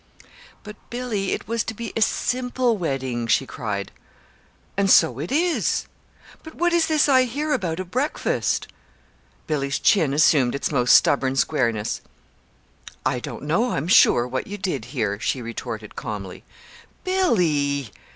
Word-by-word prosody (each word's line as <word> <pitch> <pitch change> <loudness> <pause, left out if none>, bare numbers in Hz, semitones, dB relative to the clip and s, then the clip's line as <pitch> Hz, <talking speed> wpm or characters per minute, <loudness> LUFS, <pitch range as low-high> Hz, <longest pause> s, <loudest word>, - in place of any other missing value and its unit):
"But 210 -1 -10
Billy, 235 -6 -3
it - - -3
was 230 0 -1
to 225 - -6
be 230 +1 -6
a 225 - -1
simple 250 +1 +1
wedding," 130 - -3
she 135 - +2
cried. 105 -6 -5 0.8
"And 200 0 +1
so 125 -8 +5
it 155 - -5
is." 335 +4 +1 0.6
"But 315 - -12
what 350 +1 +1
is 340 -1 +3
this 310 -2 +3
I 260 -2 +5
hear 295 +5 -2
about 170 -2 -2
a 185 - -3
breakfast?" 255 - -1 0.8
Billy's 140 -3 -1
chin 160 -9 +3
assumed 140 -3 +3
its 140 - -2
most 125 -4 +4
stubborn 135 -1 +3
squareness. 115 -7 0 1.0
"I 130 -1 +1
don't - - -7
know, 175 +12 +1
I'm 140 +4 -2
sure, 125 - +5
what 130 +1 -4
you 205 - -6
did 190 -2 -3
hear," 105 -7 -2
she 130 - -1
retorted 115 -2 -7
calmly. 100 -4 -6 0.6
"Billy!" 150 - +1
160 Hz, 145 wpm, -23 LUFS, -, 1.0 s, so